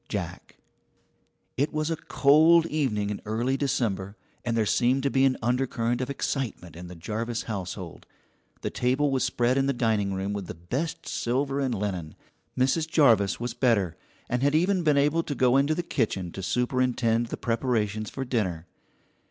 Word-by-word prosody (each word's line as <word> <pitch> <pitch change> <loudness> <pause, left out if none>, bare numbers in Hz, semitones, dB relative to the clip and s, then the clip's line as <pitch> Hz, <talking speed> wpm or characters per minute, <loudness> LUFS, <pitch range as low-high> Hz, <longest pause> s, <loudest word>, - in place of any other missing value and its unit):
JACK. - - -5 1.0
It 140 +4 +1
was 155 +1 -1
a - - +1
cold 160 +2 +4
evening 125 -11 -1
in 105 - -5
early 120 +5 -1
December, 105 -8 -1 0.3
and 115 -1 -1
there 110 - +2
seemed 125 +5 +2
to 140 - +1
be 135 0 +4
an 130 -1 +2
undercurrent 120 -1 0
of 130 - -3
excitement 130 - -3
in 90 +1 -8
the 90 - -9
Jarvis 115 +7 -3
household. 95 -4 -6 0.5
The - - -3
table 130 +4 +1
was 130 -1 +1
spread 130 0 +1
in 135 - +1
the 140 - +2
dining 110 -5 0
room 95 +2 -2
with 100 -3 -4
the - - -6
best 125 - -4
silver 135 +3 -1
and 130 -4 0
linen. 95 -6 -4 0.4
Mrs. 135 +5 +1
Jarvis 115 - +4
was 120 0 -3
better, 110 -9 +1 0.3
and 125 +1 -1
had 145 +2 +2
even 180 +3 +2
been 150 -3 +3
able 150 +4 +3
to 145 -3 -4
go 125 -1 +3
into 140 +3 +3
the 175 - -2
kitchen 100 - -1
to 95 - -7
superintend 120 +1 +1
the - - -5
preparations 110 -3 -1
for 135 - -5
dinner. 95 -10 -1
125 Hz, 175 wpm, -27 LUFS, 105-140 Hz, 1.0 s, cold